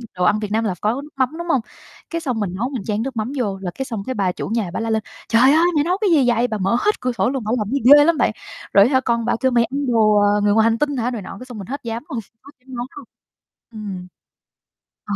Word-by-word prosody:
đồ 180 - -1
ăn 210 +4 +3
Việt 210 -1 -5
Nam 225 +1 +1
là 205 -4 0
có 230 +6 0
nước 295 - -12
mắm, 260 -2 +2
đúng 345 - -6
hông? 270 -7 +2 0.5
Cái 335 -1 -3
xong 250 -7 -2
mình 185 -3 -2
nấu 240 +6 -2
mình 250 -8 -5
chan 210 +1 -2
nước 265 -1 -5
mắm 220 +3 -2
vô, 205 -6 -1
là 180 -2 -4
cái 265 - -4
xong 220 -6 -5
cái 260 - -3
bà 195 -3 +1
chủ - - -6
nhà 220 -6 -1
bả - - -2
la 225 0 -2
lên: 220 -1 0 0.3
"Trời 230 0 +4
ơi! 295 +6 +5
Mày 290 - +3
nấu 360 +3 0
cái 410 - +2
gì 285 -6 +4
vậy?" 240 +1 +2
Bà 220 -3 -3
mở 195 +4 +1
hết 420 +8 0
cửa 250 - 0
sổ 215 -2 0
luôn, 265 -2 -3
bả 215 - -3
làm 210 -2 -2
gì 280 - 0 0.2
ghê 290 - +7
lắm 335 -1 +3
bạn. - - +2 0.4
Rồi 200 +1 +7
á 270 - -2
hả, 260 - +4
con 235 -2 0
bả 240 - +1
kêu 260 -1 +2
"Mày 235 -1 +4
ăn 275 +4 -3
đồ, 220 -3 +3
ờ, 205 0 +3
người 205 0 +3
ngoài 220 - +4
hành 230 0 +2
tinh 290 +1 -1
hả" 245 +1 -1
này 235 -4 -4
nọ, 195 - -9
cái 255 - -9
xong 245 -3 -9
mình 195 -3 -8
hết 280 +2 -5
dám 230 0 -4
luôn, 240 - -3 0.3
hết 280 - -13
dám 260 -1 -10
nấu 240 0 -3
luôn. 285 - -9 0.7
Ừm. 200 -5 -7 1.0
Ờ, 205 - -3
235 Hz, 305 wpm, -20 LUFS, 210-265 Hz, 1.0 s, ghê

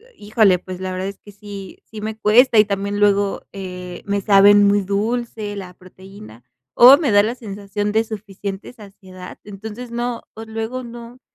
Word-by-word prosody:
híjole, 205 -3 +2
pues, 185 0 -9
la 185 0 -4
verdad 185 +1 -3
es 200 - -11
que 205 - -16
sí, 200 -1 -10
sí 220 - -11
me 215 +1 -5
cuesta, 230 +3 +4
y - - +8
también 200 0 -3
luego, 200 -1 +1
eh, 180 -2 -8
me 200 0 -1
saben 205 0 +6
muy 200 0 +2
dulce 210 +1 -3
la 185 -2 -8
proteína, 180 - -15 0.3
o 255 +3 +9
me 290 -6 0
da 205 0 +6
la 225 +4 -2
sensación 205 -2 -5
de 220 +1 +2
suficiente 200 -1 -7
saciedad, 190 -4 -13
entonces 220 +4 -9
no, 240 0 -3
o 225 - -9
luego 225 +3 -5
no, 235 +1 -11
205 Hz, 175 wpm, -20 LUFS, 195-220 Hz, 0.3 s, o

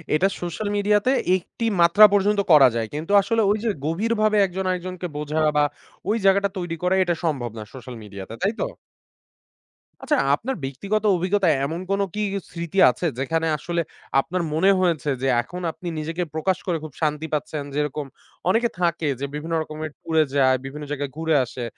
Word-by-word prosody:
এটা 190 +5 +3
সোশ্যাল 175 +5 -3
মিডিয়াতে 205 +4 +2 0.3
একটি 230 +5 -6 0.2
মাত্রা 185 +6 +8
পর্যন্ত 205 +1 +3
করা 140 -4 +9
যায়। 115 -1 -1
কিন্তু 160 +6 -4
আসলে 225 +2 +1
ওই 210 - +2
যে - - +2 0.2
গভীরভাবে 215 +5 +1
একজন 190 +1 -4
আরেকজনকে 180 0 -3
বোঝা 150 +1 -2 0.2
বা 145 - +5 0.5
ওই 220 - +3
জাগাটা 200 +1 +4
তৈরি 175 -2 -3
করা 185 +1 +3
এটা 175 -2 0
সম্ভব 130 -7 -1
না 110 - -5
সোশ্যাল 125 -1 -9
মিডিয়াতে। 100 +1 -9
তাইতো? 220 - 0 1.4
আচ্ছা, 300 - +2 0.2
আপনার 260 - -4
ব্যক্তিগত 200 +12 -2
অভিজ্ঞতায় 185 -3 +2
এমন 165 +4 -3
কোন 195 - +1 0.2
কি 210 - -1 0.3
স্মৃতি 170 +2 -6
আছে? 125 +8 -3
যেখানে 165 +4 0
আসলে 170 +2 -2 0.4
আপনার 180 +6 -1
মনে 175 +5 +3
হয়েছে 165 -5 +1
যে, 135 - 0
এখন 180 +9 -8
আপনি 175 - -10
নিজেকে 165 +3 -3
প্রকাশ 180 +4 0
করে 170 -2 +1
খুব 155 -4 -8
শান্তি 150 0 0
পাচ্ছেন? 150 +1 -2
যেরকম 150 0 -1 0.4
অনেকে 235 +4 +3
থাকে 170 -3 0
যে 140 - -2
বিভিন্ন 160 +3 -4
রকমের 155 0 -5
ট্যুরে 160 -1 +2
যায়, 130 -1 +4
বিভিন্ন 150 +2 -7
জায়গায় 145 -1 -3
ঘুরে 160 -1 +1
আসে 120 +1 -7
170 Hz, 170 wpm, -23 LUFS, 150-195 Hz, 1.4 s, করা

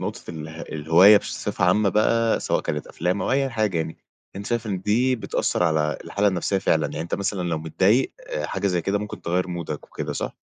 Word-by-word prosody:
نقطة - - -5
اله 80 0 -8
الهواية 85 +7 +5
بصفة 90 - -2
عامة 100 +3 +3
بقى، 115 +2 +2
سواء - - 0
كانت 75 0 -4
أفلام 90 +3 -2
أو - - -1
أي 135 0 +1
حاجة 110 -6 0
يعني، 80 0 -3 0.4
أنت 100 - -6
شايف 120 -2 -1
إن 95 -3 -2
دي 125 +5 +2
بتأثّر 110 - -1
على 75 -3 +1
الحالة 100 0 +1
النفسيّة 95 +1 0
فعلًا، 80 -4 +1
يعني 75 - -5
أنت 85 +1 -3
مثلًا 100 -2 -2
لو 80 -2 -1
متضايق 95 - +2 0.2
آآ - - -3
حاجة 100 - -2
زي 90 -3 0
كده 100 +3 0
ممكن 105 -3 -7
تغيّر 90 +2 0
مودك 85 -4 -5
وكده - - -5
صح؟ - - -4
95 Hz, 205 wpm, -24 LUFS, 80-105 Hz, 0.4 s, الهواية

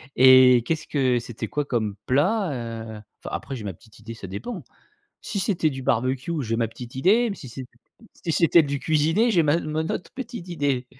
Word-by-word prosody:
et 130 -1 +7
qu'est-ce 160 +1 -2
que 130 -4 +1
c'était 115 -1 -6
quoi 145 +4 -2
comme 110 -6 -1
plat? 180 - +2
Heu, 115 -3 -6 0.2
enfin, - - -5
après 135 - -6
j'ai 115 - -7
ma 100 -3 -4
petite 110 +6 -19
idée, 115 +2 -8
ça 110 -4 -9
dépend. 175 - -6 0.6
Si 200 - -3
c'était 185 -6 +1
du 135 -2 -6
barbecue, 130 +6 0
j'ai 115 -1 -1
ma 115 0 0
petite 120 +2 -10
idée, 200 - +3
m 205 - -3
si 130 - -10
c'est 130 +3 -7 0.5
si 170 - -4
c'était 170 +1 +5
du 140 -1 -2
cuisiner 160 - +2
j'ai 175 -5 +4
ma 150 +2 +2
mon 155 0 -3
autre 170 - -4
petite 240 -8 -7
idée. 140 -6 -1
135 Hz, 200 wpm, -24 LUFS, 120-165 Hz, 0.6 s, et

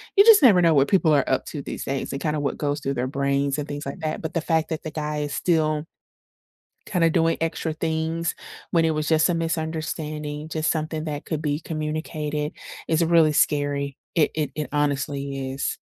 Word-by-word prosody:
you 400 - +8
just 450 -2 +9
never 205 -8 +7
know 165 -2 +5
what 140 0 +4
people 180 -5 +4
are 140 -3 +3
up 130 - +1
to 145 - -5
these - - -6
days 135 0 -3
and 135 - -4
kinda 150 -1 0
what 145 - -2
goes 145 0 -1
through 135 0 -1
their 125 +1 -1
brains 140 +1 0
and 150 -1 -3
things 145 0 -5
like 140 +6 -6
that, 155 0 -2
but 160 - -5
the 165 - +1
fact 160 -1 0
that 160 -2 -4
the 155 - -5
guy 150 -1 -3
is 145 -1 -3
still 155 -3 +1 1.0
kinda 170 -4 +2
doing 165 0 +2
extra 165 0 -1
things 160 +1 -1 0.4
when 165 -1 +3
it 160 - +2
was 155 -1 -2
just 160 +1 +4
a 175 - +1
misunderstanding, 155 -2 -3
just 155 0 0
something 155 0 -2
that 150 -2 -4
could 155 -2 -3
be 150 0 -1
communicated 155 -1 -3 0.4
is 165 +1 +3
really 165 -2 +4
scary. 145 -2 +1 0.2
It 160 -4 +3
it 150 -3 -1
it 150 -1 -3
honestly 140 -2 -1
is. 135 - -2
155 Hz, 205 wpm, -24 LUFS, 145-160 Hz, 1.0 s, just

